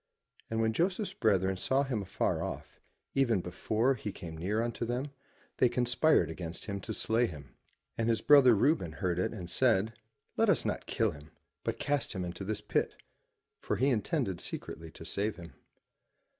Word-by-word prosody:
And 110 - -1
when 110 0 +2
Joseph's 185 - 0
brethren 95 -3 +2
saw 135 +8 +2
him 125 -6 -2
afar 95 - -1
off, - - -6 0.3
even 120 -7 +3
before 110 +8 0
he 105 -4 -5
came 85 -4 -8
near 95 +7 -1
unto 120 0 -2
them, 125 +5 -2 0.5
they 125 - +5
conspired 125 - +3
against 85 +1 -6
him 100 -1 -4
to 110 - -6
slay 115 +2 +2
him. 70 -6 -10 0.4
And 115 0 +1
his 115 - +2
brother 135 -5 +7
Reuben 100 - +2
heard 90 +1 -1
it 90 - 0
and 95 -6 -6
said, 110 +1 +2 0.4
*'Let - - +4
us - - +3
not - - -2
kill - - +1
him, 75 +1 -12 0.3
but - - -2
cast 145 -4 -1
him 95 -3 -3
into 90 +2 -6
this 105 +1 -3
pit,'* - - 0 0.6
for - - -1
he 135 +3 +2
intended 110 - 0
secretly 80 0 -6
to 80 - -11
save 100 +4 -1
him. 85 -4 -11
110 Hz, 175 wpm, -31 LUFS, 90-125 Hz, 0.6 s, brother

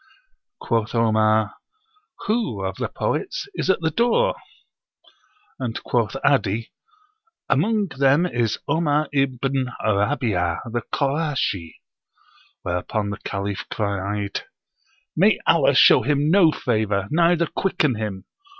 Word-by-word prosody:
Quoth 115 0 -1
Omar, 110 -2 +2 0.7
"Who 210 - -1
[of 95 -1 -4
the - - -2
poets] - - -3
is 345 - -3
at 190 - +2
the 160 -1 0
door?" 245 - +2 1.3
And 120 -3 -3
quoth 115 -4 0
'Adi, 115 -5 +1 0.8
"Among 215 -2 +1
them 140 +4 +3
is 120 - -1
Omar 155 -2 +1
ibn 135 -1 0
Rabí'ah, 105 -5 0
the 120 +1 -1
Korashi;" 140 - -1 0.9
whereupon 100 +4 -2
the 100 - -6
Caliph 100 0 -4
cried, 100 -1 -3 0.7
"May - - +4
Allah - - +4
show - - +7
him 145 +4 +1
no 175 -4 +6
favor, 110 -7 -1
neither 170 +1 +3
quicken 155 -5 0
him! 105 -4 -5
120 Hz, 110 wpm, -22 LUFS, 105-150 Hz, 1.3 s, show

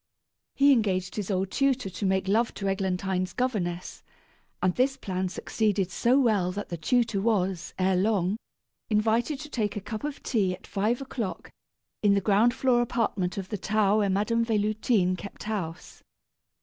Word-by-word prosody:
He 280 +1 +5
engaged 190 -7 +1
his 210 -2 -3
old 190 -1 -1
tutor 270 -5 +1
to 190 +2 -4
make 190 0 +1
love 225 +4 +1
to 195 - -3
Eglantine's 190 -1 -1
governess, 185 -9 -2 0.6
and 185 -1 +2
this 265 +4 +1
plan 185 -1 -2
succeeded 200 -1 -1
so 245 +6 +3
well 210 -8 +2
that 205 +2 -5
the 170 - -3
tutor 230 +3 +1
was, 190 -5 0
ere 185 0 +2
long, 195 0 +1 0.5
invited 225 +6 +1
to 300 - -8
take 215 -7 -2
a - - -2
cup 215 +3 -6
of 295 -1 -5
tea 195 -6 +1
at 185 - -17
five 220 +5 -1
o'clock, 240 -7 -5 0.5
in 205 -1 +4
the - - +3
ground 210 +4 +3
floor 255 -2 +3
apartment 205 -7 -1
of 190 -1 -5
the 210 - -3
tower 210 +1 +2
where 205 -2 +2
Madame 210 +4 +1
Véloutine 215 -3 +1
kept 200 +2 -9
house. 185 -6 -5
205 Hz, 165 wpm, -27 LUFS, 190-230 Hz, 0.6 s, He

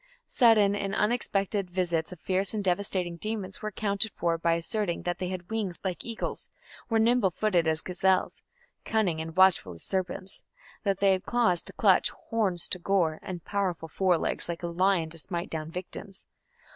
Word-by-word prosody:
Sudden 215 -5 +4
and 200 -1 -2
unexpected 205 -3 0
visits 175 -3 -1
of 180 - -9
fierce 190 +2 +2
and 210 - -2
devastating 180 -2 -1
demons 205 -1 -4
were 215 - -2
accounted 205 +1 +1
for 170 -1 +1
by 165 0 +1
asserting 170 +2 -2
that 175 0 -2
they 180 - -2
had 185 +1 -6
wings 205 -6 -2
like 185 -3 -3
eagles, 230 -1 -4 0.4
were 225 - +2
nimble 230 -2 +4
footed 180 -2 +1
as 160 0 +2
gazelles, 185 +1 0 0.4
cunning 190 -8 0
and 160 +1 -7
watchful 185 - +4
as 85 - -11
serpents; 185 0 -2 0.4
that 195 -2 -1
they 200 -1 +5
had 185 -1 -1
claws 230 -8 +3
to - - -7
clutch, - - +4 0.2
horns 195 -7 +1
to 185 - +1
gore, 170 -4 +1
and 180 -3 -7
powerful 185 -5 -2
fore 180 +1 +2
legs - - 0
like 170 0 -4
a - - -1
lion 170 -1 +1
to 165 - -6
smite 175 +2 -4
down 155 -1 -4
victims. 185 +3 -8
185 Hz, 180 wpm, -28 LUFS, 170-200 Hz, 0.4 s, they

